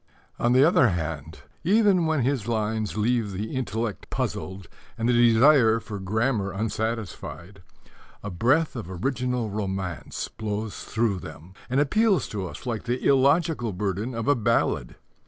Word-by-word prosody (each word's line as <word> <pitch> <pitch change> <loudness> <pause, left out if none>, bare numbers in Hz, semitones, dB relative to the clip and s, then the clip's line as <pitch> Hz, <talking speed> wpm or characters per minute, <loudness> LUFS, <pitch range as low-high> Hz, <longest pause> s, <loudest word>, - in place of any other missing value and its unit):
On 120 +1 +2
the 130 +3 +6
other 155 -6 +5
hand, 80 -4 -4 0.2
even 195 -2 +4
when 155 -5 +1
his 125 -4 0
lines 110 -2 -1
leave 110 -1 +1
the 105 +6 -4
intellect 115 -4 -3
puzzled 95 -1 -4 0.3
and 115 - -1
the 125 - +3
desire 120 0 +5
for 105 -3 -7
grammar 105 +1 0
unsatisfied, 105 -3 -4 0.6
a 105 - -4
breath 130 - +2
of 110 -7 -6
original 125 +3 -2
romance 95 -4 -4
blows 105 0 -5
through 110 -5 0
them 85 +2 -11 0.2
and 130 +2 +1
appeals 200 +7 +2
to 100 -3 -4
us - - -10
like 115 -2 -3
the 125 +1 -2
illogical 140 - +3
burden 100 +5 -2
of 115 0 -3
a 145 - +6
ballad. 110 - 0
115 Hz, 145 wpm, -25 LUFS, 100-130 Hz, 0.6 s, the